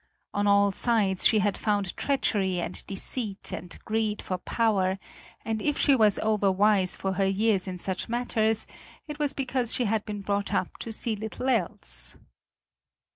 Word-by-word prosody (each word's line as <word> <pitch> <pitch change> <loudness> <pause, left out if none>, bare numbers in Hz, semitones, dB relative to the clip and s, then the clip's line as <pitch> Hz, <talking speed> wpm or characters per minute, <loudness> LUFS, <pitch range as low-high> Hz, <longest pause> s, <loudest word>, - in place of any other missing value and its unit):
On 205 0 +1
all 200 0 +5
sides 200 -3 +2
she 220 - +3
had 205 -1 +2
found 205 -3 -1
treachery 200 -9 0
and 175 - -4
deceit 200 +1 -3
and 175 - -6
greed 215 -1 0
for 185 -1 -3
power, 195 -4 +1 0.5
and 220 -1 -1
if 295 +3 0
she 280 - +5
was 215 -5 +4
overwise 205 -2 +3
for 190 0 -2
her 195 +1 +1
years 195 -1 +2
in 185 -1 -4
such 190 +3 -4
matters, 225 -2 0 0.4
it 300 0 -7
was 290 -2 +1
because 255 -3 -1
she 245 - +1
had 215 0 +1
been 205 -1 -5
brought 200 0 -1
up 185 - -1
to 230 - -5
see 220 0 0
little 220 +5 -4
else. - - -2
210 Hz, 165 wpm, -27 LUFS, 195-225 Hz, 0.5 s, all